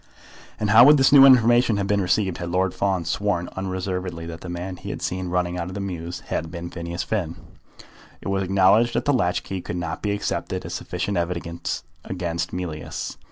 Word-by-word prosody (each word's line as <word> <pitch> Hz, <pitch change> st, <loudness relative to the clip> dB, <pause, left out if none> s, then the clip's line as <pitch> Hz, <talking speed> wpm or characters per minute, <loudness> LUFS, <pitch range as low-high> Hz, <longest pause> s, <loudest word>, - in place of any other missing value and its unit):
And 105 Hz, -1 st, 0 dB
how 115 Hz, +2 st, +9 dB
would 150 Hz, +2 st, +8 dB
this 135 Hz, -1 st, +4 dB
new 135 Hz, -1 st, +9 dB
information 120 Hz, -3 st, +5 dB
have 100 Hz, -, -1 dB
been 100 Hz, 0 st, +1 dB
received 95 Hz, 0 st, 0 dB
had 85 Hz, -1 st, -4 dB
Lord 90 Hz, +1 st, +1 dB
Fawn 95 Hz, -4 st, 0 dB
sworn 85 Hz, 0 st, -1 dB
unreservedly 95 Hz, -2 st, -4 dB
that 85 Hz, 0 st, -8 dB
the 90 Hz, -, -7 dB
man 90 Hz, +1 st, -5 dB
he -, -, -8 dB
had -, -, -4 dB
seen 90 Hz, 0 st, -3 dB
running 90 Hz, 0 st, -1 dB
out 85 Hz, -, -3 dB
of 90 Hz, -, -7 dB
the -, -, -4 dB
mews 90 Hz, -3 st, -5 dB
had 80 Hz, -, -4 dB
been 85 Hz, +1 st, -7 dB
Phineas 85 Hz, +1 st, -4 dB
Finn? 90 Hz, -7 st, -2 dB, 0.8 s
It -, -, -8 dB
was 95 Hz, 0 st, 0 dB
acknowledged 95 Hz, +5 st, +3 dB
that -, -, 0 dB
the 145 Hz, -, +3 dB
latch 90 Hz, -8 st, +1 dB
key 95 Hz, -2 st, -5 dB
could 90 Hz, -, -5 dB
not 85 Hz, -2 st, -4 dB
be 105 Hz, -, -1 dB
accepted 100 Hz, 0 st, -2 dB
as -, -, -6 dB
sufficient 100 Hz, -2 st, -3 dB
evidence 85 Hz, -3 st, -3 dB, 0.2 s
against 85 Hz, -3 st, -3 dB
Mealyus. 85 Hz, -4 st, -5 dB
90 Hz, 205 wpm, -23 LUFS, 85-100 Hz, 0.8 s, how